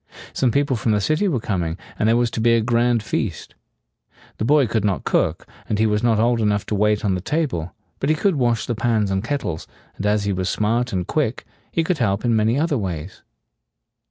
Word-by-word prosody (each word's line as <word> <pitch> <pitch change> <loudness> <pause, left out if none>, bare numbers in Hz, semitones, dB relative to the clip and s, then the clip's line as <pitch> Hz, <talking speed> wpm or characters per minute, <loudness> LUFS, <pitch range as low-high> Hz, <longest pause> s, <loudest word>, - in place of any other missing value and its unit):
Some 130 - +2
people 140 +2 +1
from 110 -1 0
the 105 - +2
city 155 - +1
were 145 -10 0
coming, 90 -6 -2 0.2
and 110 - +3
there 115 - +4
was 120 -1 +1
to 110 - -3
be 115 +1 +4
a 115 - +2
grand 115 0 +2
feast. 105 -5 -3 0.9
The - - -1
boy 145 +2 +4
could 110 -2 -1
not 100 -3 0
cook, - - 0 0.2
and 105 - 0
he 110 - +3
was 105 -1 +1
not 115 -2 +2
old 115 +1 +2
enough 105 -1 +1
to - - -2
wait 105 +1 +1
on 100 - +2
the 90 - -2
table; 100 - -2 0.2
but 140 - -1
he 155 - +4
could 195 +5 +1
wash 120 -4 +1
the 120 - -1
pans 110 -3 0
and 95 +1 0
kettles, 120 - -3 0.3
and 100 - -2
as 105 0 +2
he 100 -1 0
was 95 0 -1
smart 120 +4 0
and 90 -3 -1
quick, 135 - -1 0.3
he 165 - +1
could 165 0 -1
help 100 -2 0
in 120 -1 +3
many 110 +3 +2
other 150 -4 +1
ways. 90 -3 -5
110 Hz, 225 wpm, -21 LUFS, 105-125 Hz, 0.9 s, there